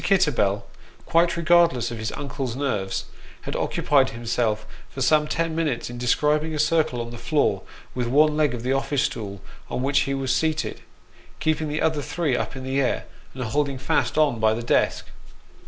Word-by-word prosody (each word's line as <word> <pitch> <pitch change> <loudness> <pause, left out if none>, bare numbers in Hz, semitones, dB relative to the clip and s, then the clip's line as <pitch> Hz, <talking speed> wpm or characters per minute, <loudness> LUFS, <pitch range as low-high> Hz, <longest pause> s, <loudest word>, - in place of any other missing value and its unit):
Kitterbell, 145 - +2 0.4
quite 170 +1 +2
regardless 170 -8 +3
of 115 - -5
his 110 0 -3
uncle's 135 -3 -4
nerves, 115 -9 -2 0.4
had - - -5
occupied 140 -3 +2
himself 115 -2 -1 0.2
for - - -9
some 150 +4 +3
ten 165 +1 -1
minutes 150 -8 -1
in 120 - -7
describing 150 +5 +1
a - - -2
circle 150 -4 +2
on 115 0 -6
the 120 - -8
floor 130 -11 +1 0.3
with 125 -2 -2
one 150 +4 +4
leg 150 -5 +2
of 115 - -7
the 130 +2 +1
office 135 0 0
stool 100 -3 -4 0.3
on 125 - -2
which 140 +1 +3
he 135 - 0
was 135 -1 0
seated, 155 +2 -1 0.6
keeping 155 0 0
the 150 +1 -1
other 155 -2 +1
three 145 -1 -1
up - - -3
in 130 - -7
the 135 +1 0
air, 130 - 0 0.3
and 130 - -4
holding 140 +4 -1
fast 155 +3 0
on 145 -7 +3
by 110 0 +3
the 115 - -4
desk. 120 - +1
135 Hz, 185 wpm, -24 LUFS, 120-155 Hz, 0.6 s, one